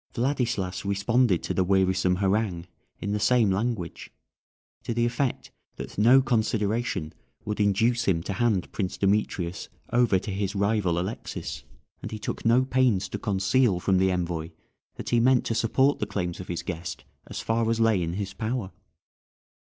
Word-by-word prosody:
Vladislas 120 -7 -1
responded 100 +1 +2
to - - -2
the 95 - +2
wearisome 95 -1 +2
harangue 95 -2 0 0.3
in 100 - -3
the 105 - 0
same 115 -2 +3
language, 100 -3 -3 0.7
to 115 - -4
the 120 0 +2
effect 120 +2 -2 0.2
that - - -8
no 125 +6 +6
consideration 110 -7 0 0.3
would 105 0 -3
induce 115 +4 +2
him 85 -4 +1
to 100 - -3
hand 105 -3 0
Prince 95 -2 -3
Demetrius 95 -3 -1 0.2
over 120 -5 +4
to 100 - -5
his 100 +1 -2
rival 100 -3 +1
Alexis, 95 +6 -5 0.4
and - - -5
he 110 - -5
took 105 - -5
no 120 +3 +4
pains 125 -7 +2
to - - -5
conceal 100 +1 +2
from 95 +1 +2
the 95 0 +3
envoy 85 -3 -2 0.5
that - - -6
he 120 - +4
meant 125 +1 +4
to - - -1
support 130 +5 +2
the 105 - -2
claims 90 -4 -3
of 90 - -7
his 85 - -4
guest 85 -1 -5 0.2
as - - -6
far 115 0 0
as 115 0 0
lay 110 -4 +3
in 85 0 -2
his 100 0 -4
power. 110 -3 -3
105 Hz, 165 wpm, -26 LUFS, 95-115 Hz, 0.7 s, no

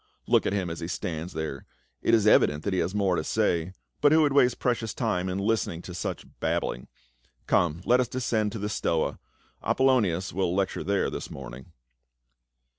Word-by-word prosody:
" - - -41
Look - - +3
at - - 0
him 95 -4 -1
as 80 - -5
he 85 - -4
stands 85 0 -4
there; 75 -4 -5 0.3
it - - +4
is 110 -2 +2
evident 75 -8 +4
that 100 - -1
he 95 - +1
has 95 - -1
more 100 -3 +2
to 80 - -1
say, 90 -4 0 0.3
but 145 0 +5
who 160 0 +6
would 145 -2 +2
waste 125 -3 +4
precious 115 -4 -1
time 95 -6 -1
in 90 - -2
listening 100 -5 -1
to 90 - -8
such 90 - -4
babbling? 60 - -2 0.6
Come, 85 0 +1
let 125 +1 +4
us 125 - +1
descend 115 -4 -1
to - - -4
the 105 0 -3
Stoa; 85 -5 -1 0.4
Apolonias 105 -10 +2
will 90 -1 0
lecture 95 -1 -1
there 100 -1 0
this - - -5
morning." 65 +4 -9
95 Hz, 190 wpm, -27 LUFS, 85-115 Hz, 0.6 s, who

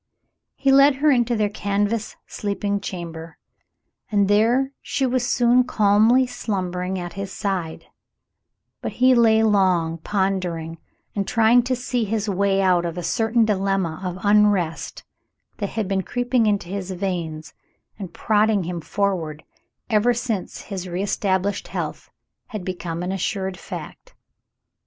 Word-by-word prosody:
He 275 -1 +2
led 275 +1 +6
her 295 +2 +3
into 240 -2 +2
their 215 -2 +1
canvas 205 +2 -1
sleeping 205 0 -2
chamber, 165 -3 -7 0.7
and 200 -2 +3
there 235 +6 +3
she 270 - -1
was 255 -1 0
soon 245 +1 +4
calmly 220 +2 +4
slumbering 190 -6 -3
at 175 -1 -5
his 195 -1 -5
side; 185 -6 -3 1.0
but - - -4
he 255 +1 +4
lay 225 -2 +4
long 185 -6 +2
pondering 180 -4 -2 0.4
and 200 -2 -1
trying 230 +1 +4
to 255 +2 -1
see 245 -1 -2
his 220 0 -2
way 195 0 +1
out 180 -2 +3
of 170 0 -4
a 175 - -4
certain 225 +3 +2
dilemma 195 -5 -1
of 180 -1 -3
unrest 205 -5 +2 0.5
that 200 -2 -3
had 220 -3 -3
been 195 0 0
creeping 245 +2 0
into 205 -4 0
his 190 0 -5
veins 170 -5 -4 0.5
and 190 -4 -6
prodding 210 0 +2
him 170 0 -4
forward 165 -2 -2 0.4
ever 235 +2 +2
since 225 -5 -3
his 190 -3 -6
reestablished 195 +1 -1
health - - -5 0.4
had 215 -7 -6
become 175 -2 -4
an 180 - -2
assured 190 0 -2
fact. - - -9
200 Hz, 140 wpm, -22 LUFS, 180-225 Hz, 1.0 s, led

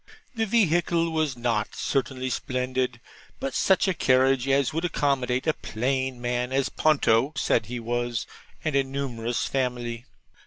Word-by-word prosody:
The 225 -2 -1
vehicle 170 -5 +2
was 155 -5 0
not 115 -3 -1
certainly 130 -2 -1
splendid, 130 -1 -2 0.4
but 135 - -3
such 190 0 +3
a 190 - +2
carriage 130 -3 +3
as 140 +1 +2
would 165 +2 -1
accommodate 130 -6 0
a 155 - +3
plain 130 +2 -2
man 125 +1 -1
(as 135 0 +1
Ponto 140 -3 +2
said 110 -5 +1
he 125 +1 -4
was) 120 0 -2 0.4
and 155 -3 0
a 135 - +4
numerous 125 -4 -3
family. 120 -2 -2
130 Hz, 145 wpm, -26 LUFS, 120-145 Hz, 0.4 s, a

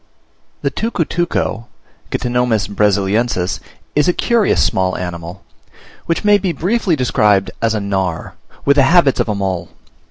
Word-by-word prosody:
The - - 0
Tucutuco 175 - -2 0.4
(Ctenomys 125 -3 0
Brasiliensis) 100 -1 0 0.4
is 150 - +3
a 180 - +3
curious 230 0 +2
small 95 -1 0
animal, 90 +1 -6 0.6
which 165 - -1
may 205 -1 +5
be 185 -2 -1
briefly 185 +3 0
described 105 -7 +2
as 115 -1 +1
a - - 0
Gnawer, 95 -4 -2 0.3
with 140 +1 +4
the - - +6
habits 165 -6 +4
of - - 0
a 105 - 0
mole. 95 -4 -3
115 Hz, 135 wpm, -17 LUFS, -, 0.6 s, the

